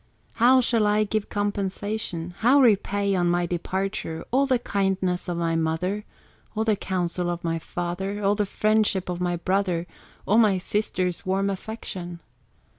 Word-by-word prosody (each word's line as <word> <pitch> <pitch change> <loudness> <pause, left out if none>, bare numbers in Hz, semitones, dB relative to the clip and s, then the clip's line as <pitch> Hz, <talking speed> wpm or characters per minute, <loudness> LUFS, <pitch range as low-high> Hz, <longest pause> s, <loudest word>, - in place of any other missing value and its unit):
"How 255 +2 +7
shall 230 -3 +2
I 210 +1 +3
give 215 0 -2
compensation, 200 -3 -3
How 255 +5 +5
repay, 200 -4 +3
on 175 -2 +2
my 175 0 +2
departure, 175 -1 -3
All 275 +3 +3
the 260 -2 +3
kindness 190 -5 -1
of 175 - -2
my 165 -1 0
mother, 165 +6 -1 0.5
All 220 - +1
the 220 -1 +2
counsel 180 -2 -2
of 175 0 -3
my 165 -1 -1
father, 185 +5 -4
All 200 +1 +4
the 210 -1 0
friendship 210 -3 +1
of 180 0 -3
my 175 -1 0
brother, 180 -1 0 0.4
All 215 +3 +4
my 210 -4 +4
sister's 185 -2 -1
warm 195 +1 0
affection? 185 -4 -6
195 Hz, 155 wpm, -25 LUFS, 175-210 Hz, 0.5 s, How